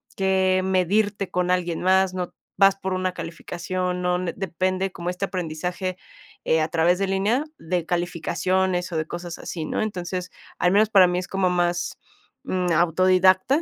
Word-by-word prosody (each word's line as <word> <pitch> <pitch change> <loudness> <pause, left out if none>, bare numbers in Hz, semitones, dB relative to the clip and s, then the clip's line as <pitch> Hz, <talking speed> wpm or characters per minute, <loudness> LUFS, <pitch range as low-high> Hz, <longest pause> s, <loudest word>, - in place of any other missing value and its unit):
que 190 -1 +2
medirte 195 +2 +1
con 180 0 0
alguien 175 -2 0
más, 190 0 +3
no 180 -1 -4 0.2
vas 195 0 +6
por 190 -1 -4
una 185 0 -1
calificación, 180 +2 -4
no 180 0 +1
n 180 -1 -3
depende 185 0 -1
como 175 -1 -5
este 180 +2 -2
aprendizaje, 180 0 -4 0.5
eh, 160 - +3
a 155 - +1
través 170 +2 +2
de 195 - 0
línea, 200 +8 +1
de 175 - -2
calificaciones, 180 +1 0
o - - -4
de 155 0 -2
cosas 175 0 -6
así, 160 -3 -5
¿no? - - -2
Entonces, 180 -3 -3 0.3
al 180 - +3
menos 210 +2 +4
para 190 -4 +7
mí, 180 0 -1
es 180 - -6
como 190 -1 +1
más, 175 -1 0 0.5
mm, 180 -1 -1
autodidacta. 185 - +4
185 Hz, 165 wpm, -24 LUFS, 175-190 Hz, 0.5 s, para